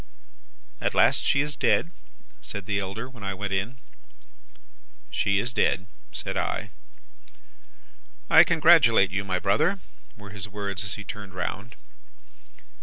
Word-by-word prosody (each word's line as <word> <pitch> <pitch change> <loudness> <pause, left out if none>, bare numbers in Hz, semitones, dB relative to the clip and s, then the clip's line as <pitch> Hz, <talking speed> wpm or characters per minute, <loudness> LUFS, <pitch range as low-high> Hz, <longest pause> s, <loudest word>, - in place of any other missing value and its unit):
"'At - - -1
last - - +4
she 140 - +2
is 150 0 -3
dead?' 165 - +1 0.5
said 100 -1 -6
the 100 -1 -1
elder, 100 +5 -5
when 130 -4 -15
I 95 0 -3
went 100 +1 -4
in. 100 +7 -2 1.3
"'She 100 -1 +1
is 120 +5 -2
dead,' 95 - +1 0.3
said - - -5
I. - - -2 1.6
"'I - - +8
congratulate 155 - +5
you, 100 +1 -1
my 95 -2 -1
brother,' 155 - +1 0.4
were 100 -1 -11
his 100 -1 -7
words 100 -1 -4
as 100 - -4
he 105 - -8
turned 100 -3 -9
round. 100 +5 -5
100 Hz, 135 wpm, -26 LUFS, 95-120 Hz, 1.6 s, I